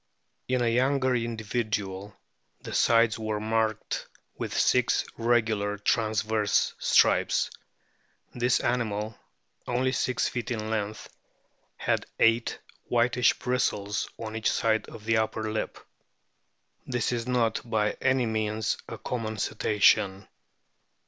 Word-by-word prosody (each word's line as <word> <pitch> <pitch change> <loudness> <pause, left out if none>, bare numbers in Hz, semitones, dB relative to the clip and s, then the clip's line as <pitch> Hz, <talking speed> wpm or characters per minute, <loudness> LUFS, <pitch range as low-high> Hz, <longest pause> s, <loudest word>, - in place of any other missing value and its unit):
In 125 -1 +1
a - - +2
younger 130 +2 +2
individual 110 -4 -3 0.5
the - - -7
sides 115 -1 +3
were 110 -1 -2
marked 110 0 -1 0.3
with - - -4
six 125 -1 +3
regular 110 -3 +1
transverse 110 0 +1
O - - -24
stripes. - - +3 0.8
This 120 0 +2
animal 110 -3 -1 0.5
(only 125 +1 +1
six 125 -1 0
feet 120 -2 -4
in 110 -2 -3
length) 105 -1 -3 0.7
had - - -1
eight 115 +1 +3 0.3
whitish 120 0 +2
bristles 105 -5 -1
on 110 -1 -6
each 110 - +1
side 110 -1 +1
of 105 - -11
the 115 0 +2
upper 110 0 -1
lip. 110 - -3 1.1
This 120 -2 -1
is 120 0 -2
not 120 -3 +1
by 110 -3 0
any 130 -1 +2
means 110 -1 -1
a - - -6
common 110 -3 -4
Cetacean. 100 -2 +2
110 Hz, 115 wpm, -27 LUFS, 110-120 Hz, 1.1 s, sides